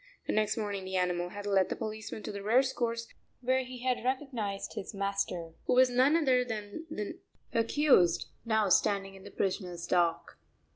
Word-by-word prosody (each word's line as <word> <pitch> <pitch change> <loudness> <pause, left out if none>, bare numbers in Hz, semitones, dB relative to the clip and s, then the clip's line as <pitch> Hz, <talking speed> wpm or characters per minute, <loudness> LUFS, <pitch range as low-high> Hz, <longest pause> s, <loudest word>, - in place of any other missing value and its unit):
The - - -1
next 215 0 +1
morning 205 -3 -2
the 190 0 -5
animal 180 -1 0
had 205 +2 -7
led 195 -2 +3
the - - -2
policeman 215 -1 -5
to - - -4
the 200 -1 -6
race 255 +6 +3
course 230 -1 -1 0.4
where 260 +1 +2
he 250 -1 -9
had 255 -2 0
recognized 250 -7 -2
his 195 - -6
master, 195 -4 -2
who - - +3
was 255 0 +6
none 260 +5 +4
other 260 -6 +3
than 220 +6 -6
the 210 -10 -5 0.3
accused 230 - +4 0.2
now 220 -3 +2
standing 195 +1 +2
in 195 0 -13
the - - -8
prisoner's 180 -3 -2
dock. 170 -2 0
215 Hz, 180 wpm, -31 LUFS, 195-250 Hz, 0.4 s, was